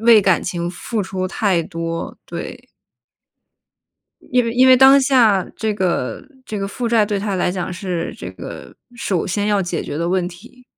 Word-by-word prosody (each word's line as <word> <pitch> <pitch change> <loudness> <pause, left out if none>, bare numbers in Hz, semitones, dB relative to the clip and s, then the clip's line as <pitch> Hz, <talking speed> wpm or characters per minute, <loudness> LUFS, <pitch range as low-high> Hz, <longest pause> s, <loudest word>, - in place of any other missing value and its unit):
为 225 -1 +7
感 190 -3 +2
情 175 -1 -3
付 220 +5 -4
出 185 0 -3
太 185 -3 +1
多， 165 0 -5
对。 - - -7 1.6
因 250 -1 +3
为 230 - -2
因 255 +2 +5
为 255 - +8
当 270 +2 +7
下 235 -8 +4
这 220 -1 -1
个 175 -10 -1 0.2
这 210 - -5
个 195 0 -3
负 240 +4 -4
债 225 -3 +3
对 205 -1 -1
他 200 -1 -2
来 180 - +1
讲 180 0 -4
是， 180 -3 -4
这 - - -7
个 - - -9 0.2
首 195 -7 -1
先 205 +3 -1
要 205 -2 +2
解 175 -2 -3
决 145 - -5
的 170 +1 -1
问 185 -1 +1
题。 245 +8 -15
195 Hz, 195 characters per minute, -19 LUFS, 180-230 Hz, 1.6 s, 为